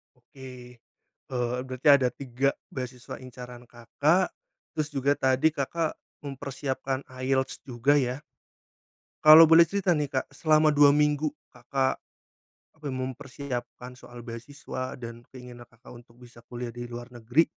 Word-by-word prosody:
Oke. 125 -1 -13 0.5
Eee, 125 -1 -1
berarti 130 +2 -1
ada 140 -3 +6
3 135 +1 -1 0.2
beasiswa 125 -1 -7
incaran 125 -1 -11
Kakak, 145 +10 +1 0.5
terus 155 -1 -1
juga 140 +1 +1
tadi 130 +3 +3
Kakak 155 +2 -2 0.3
mempersiapkan 135 -1 -4 0.2
IELTS 130 0 0
juga 130 +3 +2
ya. 130 0 -1 1.0
Kalau 155 +1 +10
boleh 165 +1 +8
cerita 180 0 0
nih, 150 - 0
Kak, 130 -1 -1
selama 155 -1 +4
2 145 -1 +6
minggu 150 0 +1 0.2
Kakak, 130 +2 -1 0.8
eee, 150 - -5
mempersiapkan 130 -1 -6
soal 120 -1 -12
beasiswa 130 +2 -7
dan 115 -1 -8
keinginan 125 -2 -12
Kakak 115 +2 -16
untuk 120 0 -23
bisa 120 -1 -16
kuliah 120 -1 -6
di 120 +1 -7
luar 120 +1 -9
negeri, 120 +7 +2
130 Hz, 130 wpm, -27 LUFS, 120-145 Hz, 1.0 s, Kalau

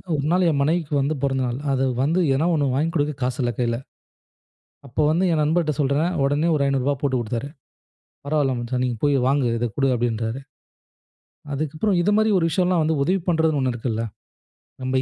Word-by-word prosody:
ஒரு 140 -1 -2
நாள் 180 +1 +3
என் 145 -3 0
மனைவிக்கு 160 0 0
வந்து 140 +3 0
பொறந்தநாள். 130 -2 -1
அத 135 0 +1 0.2
வந்து 160 +6 +1 0.2
எதாவது 155 +5 +1
ஒண்ணு 145 -2 +1
வாங்கிக் 160 +4 0
கொடுக்க 150 -1 +1
காசு 125 +3 -2
இல்ல 120 - 0
கையில. 120 -1 0 1.1
அப்போ 130 +4 -2
வந்து 175 +4 +2
என் 155 - +1
நண்பர்ட 160 +1 +1
சொல்றேன் 145 +5 +1
உடனே 145 +4 +1
ஒரு 145 - +1
ரூ.500 140 0 +1
போட்டுக் 130 -3 0
கொடுத்தாரு. 115 +3 -3 0.8
"பரவால்ல 140 -2 +1
மச்சான், 125 +1 -2
நீங்க 120 -2 -2
போய் 145 -1 +3
வாங்கு 135 -1 +2
இத 120 +1 -1
கொடு" 135 -1 +2
அப்டின்றாரு. 115 0 -2 1.1
அதுக்கப்றம் 155 +7 0
இது 195 +4 +2
மாரி 220 0 +3
ஒரு 165 - +1
விஷயம்லாம் 180 0 +1
வந்து 160 +1 +1
உதவி 185 +6 +1
பண்றதுன்னு 160 -3 +2
ஒண்ணு 130 -1 0
இருக்குல்ல. 115 -1 -2 0.8
நம்ம 130 0 0
140 Hz, 175 wpm, -22 LUFS, 130-160 Hz, 1.1 s, நாள்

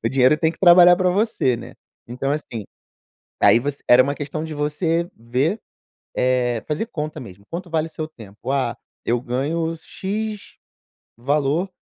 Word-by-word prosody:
o - - +3
dinheiro 130 +3 +4
tem 160 - +2
que 165 - -13
trabalhar 175 -1 +8
pra 180 0 +2
você, 190 - +1
né? 120 +2 -10 0.3
Então, 125 +3 -3
assim, 120 -8 -4 0.8
aí 115 - +7
você 140 +3 -4
era 125 +1 +8
uma 140 +2 -1
questão 150 +2 -5
de 160 - -6
você 165 +3 -1
ver, 130 - -1 0.6
eh, 125 -2 +1
fazer 155 +9 -1
conta 155 -7 -5
mesmo. 100 -4 -12
Quanto 175 +1 -6
vale 160 -1 0
o - - -11
seu 155 0 -5
tempo? 110 -5 -10
"Ah, 135 -4 0 0.3
eu 120 +1 +1
ganho 150 +7 -1
x 210 +5 -5 0.6
valor, 145 +7 0
150 Hz, 160 wpm, -22 LUFS, 125-170 Hz, 0.8 s, trabalhar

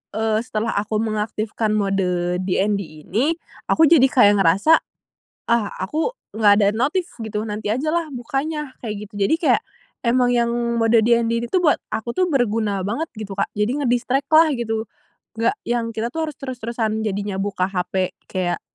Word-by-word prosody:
eee, 220 0 +1
setelah 230 -2 -2
aku 210 +1 -3
mengaktifkan 215 0 -1
mode 180 -3 0
DND 190 -4 -1
ini, 270 - +1 0.3
aku 320 - +4
jadi 320 -6 +6
kayak 205 -6 +5
ngerasa, 195 - +5 0.7
"Ah, 235 -3 +1
aku 310 - -1 0.2
nggak 210 -2 +5
ada 200 - +4
notif," 305 +10 0 0.2
gitu, 210 -1 -3
"nanti 210 0 -2
ajalah, 310 +5 -1
bukanya," 275 +4 -3
kayak 210 -2 -5
gitu. 205 -2 -2
Jadi 255 - +3
kayak, 330 - +3 0.4
emang 245 +1 +3
yang 235 0 +1 0.3
mode 225 0 +4
DND 230 +1 +2
ini - - -6
tuh, 360 +4 +1
buat 300 - +3
aku 235 +2 -3
tuh, 370 +4 +1
berguna 215 -6 0
banget, 235 - -2
gitu, 215 -2 -6
Kak. 200 0 -1
Jadi 210 +3 +1
nge-distract 255 +3 0
lah, 315 +1 +7
gitu. 225 -3 -2 0.5
Nggak 230 - +1
yang, 240 -1 0
kita 235 +3 -2
tuh 320 -1 -2
harus 300 - -8
terus-terusan, 235 -4 -3
jadinya, 205 -2 -2
buka 195 -2 -1
hape, 185 0 -1 0.2
kayak 180 -2 -2
225 Hz, 165 wpm, -21 LUFS, 205-255 Hz, 0.7 s, lah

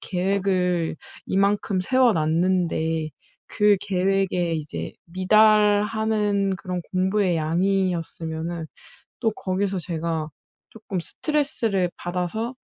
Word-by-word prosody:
계획을 180 -3 0 0.3
이만큼 200 0 +1
세워놨는데 170 -7 +1 0.4
그 210 -1 +3
계획에 190 -2 0
이제 85 - -5
미달하는 210 +1 +3
그런 180 -2 -4
공부의 185 -1 +1
양이었으면은 165 -1 -1 0.5
또 225 -3 +1
거기서 190 -1 -2
제가 160 -1 -3 0.4
조금 210 -4 -5
스트레스를 225 - -1
받아서 180 +8 -3
185 Hz, 225 characters per minute, -24 LUFS, 170-205 Hz, 0.5 s, 그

